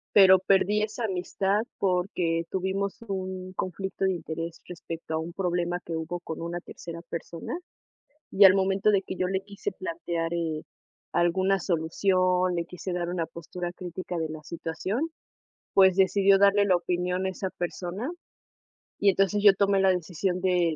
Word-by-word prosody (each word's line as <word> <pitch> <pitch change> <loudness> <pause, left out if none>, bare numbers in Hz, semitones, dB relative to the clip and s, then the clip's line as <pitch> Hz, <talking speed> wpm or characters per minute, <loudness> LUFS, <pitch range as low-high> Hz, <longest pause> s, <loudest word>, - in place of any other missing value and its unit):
pero 190 -2 +9
perdí 195 +2 +3
esa 220 +2 -3
amistad 195 +1 0 0.2
porque 180 -3 0
tuvimos 190 +3 -2
un 185 -1 -4
conflicto 190 +1 -3
de 190 - +3
interés 165 -1 -5
respecto 165 -2 -6
a - - +1
un 165 +2 -5
problema 175 -1 -1
que 165 -1 -4
hubo 165 +2 -4
con 160 -2 -6
una 170 +1 -4
tercera 170 0 -9
persona, 170 - -6 0.7
y 200 +1 +7
al 190 0 +8
momento 195 +2 +2
de 195 -2 +3
que 185 - -6
yo 185 - 0
le 190 +1 -1
quise 200 0 -5
plantear, 170 -2 -3
eh, 160 -2 -2 0.5
alguna 185 +3 +2
solución, 180 +2 +1
le 170 -1 -1
quise 180 +1 -6
dar 175 -1 -2
una 175 -2 -1
postura 170 +2 -6
crítica 180 0 -6
de 160 -1 -2
la 155 0 -7
situación, 180 - -3 0.6
pues 190 -2 +6
decidió 195 +1 +5
darle 200 +1 +5
la 185 - +4
opinión 180 +1 -1
a 190 - +1
esa 190 0 -4
persona, 180 - -4 0.9
y 200 - +5
entonces, 195 +2 +1
yo 205 -2 +9
tomé 200 0 +2
la 190 0 +5
decisión 180 +1 -1
de 175 -3 +2
185 Hz, 160 wpm, -27 LUFS, 170-195 Hz, 0.9 s, pero